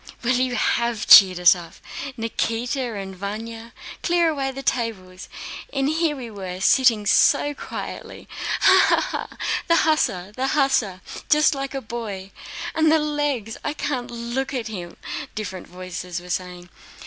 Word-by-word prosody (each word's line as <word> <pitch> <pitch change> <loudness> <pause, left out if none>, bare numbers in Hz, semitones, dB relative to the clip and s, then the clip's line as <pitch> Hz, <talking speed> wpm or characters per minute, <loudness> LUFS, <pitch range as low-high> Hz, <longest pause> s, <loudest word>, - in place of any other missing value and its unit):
Well, 245 +1 +2
you 250 0 +1
have 235 -3 0
cheered 185 -2 +9
us 180 -1 +7
up! 170 -2 -10 0.4
Nikíta 230 +1 -2
and 190 -1 -7
Vanya—clear 230 - -3
away 275 -3 -1
the 270 +1 -7
tables! 190 -8 -3 0.4
And 275 -1 0
we 300 -7 -1
were 185 -3 -6
sitting 230 0 +4
so 290 +7 +4
quietly. - - -8 0.3
Ha, - - +7
ha, - - +4 0.3
ha!... - - -17 0.3
The 335 - +4
hussar, 205 - +1
the 260 +1 -1
hussar! 235 -10 +1 0.3
Just 300 +1 +5
like 275 0 -4
a 270 - -3
boy! 210 -5 -6 0.4
And 315 -1 +3
the 320 - +5
legs!... 290 -7 -2
I 295 - -2
can't 255 -5 -3
look 240 +3 -3
at 235 -3 -3
him..." 175 -5 -7 0.4
different 190 -4 -6
voices 180 -1 -6
were 180 0 -9
saying. 180 -1 -5
230 Hz, 145 wpm, -23 LUFS, 190-270 Hz, 0.4 s, cheered